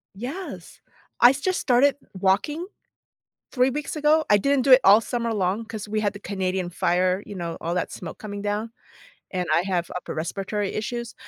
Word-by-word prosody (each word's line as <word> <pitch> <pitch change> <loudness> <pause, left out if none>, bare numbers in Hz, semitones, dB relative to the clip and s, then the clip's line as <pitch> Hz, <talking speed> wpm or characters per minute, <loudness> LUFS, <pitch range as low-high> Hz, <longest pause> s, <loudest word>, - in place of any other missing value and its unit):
Yes. 275 - -7 0.4
I 240 +1 +8
just 345 +7 -1
started 270 +2 +3 0.2
walking 200 - 0 0.8
3 255 0 +2
weeks 295 +3 -4
ago, 305 +1 +3
I 205 - +6
didn't 275 +6 +2
do 265 - +4
it 255 - +9
all 205 +3 +8
summer 235 0 -2
long 200 +1 -1
'cause 220 -2 -7
we 215 +1 -1
had 205 -2 0
the 200 - -9
Canadian 190 -2 -2
fire, 180 +2 +1
you 205 - -9
know, 170 -3 -4
all 170 - -2
that 180 - -1
smoke 165 -3 -8
coming 205 -1 -6
down, 210 +2 -2 0.6
and 180 -2 -2
I - - +4
have 180 -3 -2
upper 180 - -5
respiratory 195 +5 -3
issues, 235 +2 -4
210 Hz, 180 wpm, -24 LUFS, 190-250 Hz, 0.8 s, it